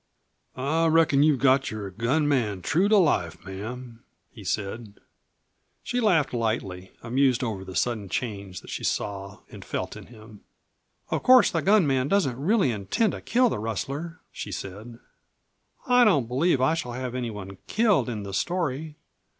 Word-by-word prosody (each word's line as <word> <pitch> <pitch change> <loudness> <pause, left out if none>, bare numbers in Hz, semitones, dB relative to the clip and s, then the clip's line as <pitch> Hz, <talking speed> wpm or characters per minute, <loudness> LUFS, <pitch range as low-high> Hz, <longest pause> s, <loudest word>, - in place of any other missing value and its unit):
"I 155 +6 +1
reckon 160 -3 +4
you've 150 -2 +4
got 135 +1 +3
your 105 -3 -6
gun 125 - 0
man 110 -10 0
true 185 +6 +2
to 215 - +5
life, 95 - +1
ma'am," 115 +5 -8 0.3
he 110 - -12
said. 105 +3 -4 0.9
She 245 - -2
laughed 180 - +2
lightly, 100 -6 -2
amused 130 +1 +2
over 105 -5 -3
the 95 -1 -9
sudden 105 +3 -1
change 100 -4 -4
that - - -11
she - - -5
saw 100 -1 -3
and - - -10
felt - - -4
in - - -11
him. 110 -2 -14 0.7
"Of - - 0
course 255 -2 +6
the - - 0
gun 200 -2 +4
man 135 -2 +1
doesn't 160 -8 +1
really 195 - +3
intend 110 - 0
to - - -7
kill 250 +2 +3
the - - -3
rustler," 135 - -4
she - - -7
said. 105 +5 -7 0.9
"I 250 0 +5
don't 145 - +3
believe 135 +5 +1
I 130 +5 +3
shall 125 -7 -3
have 125 0 -4
any 125 -2 -3
one 95 -3 -8
killed 215 - +2
in 110 -4 -4
the 100 -1 -7
story. 155 - -2
125 Hz, 165 wpm, -26 LUFS, 105-160 Hz, 0.9 s, course